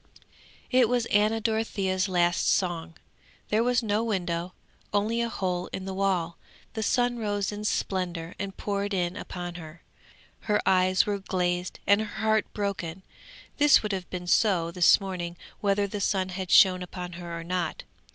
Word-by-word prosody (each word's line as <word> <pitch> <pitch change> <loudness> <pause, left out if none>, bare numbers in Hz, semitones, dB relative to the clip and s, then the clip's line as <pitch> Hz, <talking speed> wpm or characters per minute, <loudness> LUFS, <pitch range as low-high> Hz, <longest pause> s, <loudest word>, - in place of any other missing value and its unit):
It 250 -3 +4
was 245 -2 +1
Anna 215 +2 +3
Dorothea's 205 -4 0
last 175 -1 +2
song. 170 -3 0 0.5
There 215 +2 +2
was 245 0 +2
no 215 +1 +1
window; 180 -5 -2 0.4
only 215 +3 +1
a 235 - -1
hole 180 -4 -2
in 190 - -5
the 190 - -4
wall. 190 -4 -1 0.3
The 220 - -3
sun 245 +2 +1
rose 205 -2 -1
in 210 0 -6
splendour 180 -4 -2
and 195 -1 -5
poured 200 0 -2
in 175 -1 -1
upon 175 -3 -6
her; 160 +1 -12 0.7
her 210 - +4
eyes 185 0 +4
were 205 -1 -1
glazed 180 -2 -2
and 200 +2 +4
her 215 -1 -5
heart 220 -1 +2
broken! 190 -4 -4 0.5
This 295 -4 +6
would 210 - -2
have 185 -2 -4
been 180 -1 -5
so 175 -3 +2
this 175 0 +5
morning 180 -3 -5 0.2
whether 200 0 +1
the 200 +1 -5
sun 190 -2 0
had 185 0 -5
shone 185 -1 +6
upon 180 0 -6
her 170 -1 -6
or - - -7
not. 180 +1 -2
190 Hz, 165 wpm, -27 LUFS, 180-210 Hz, 0.7 s, This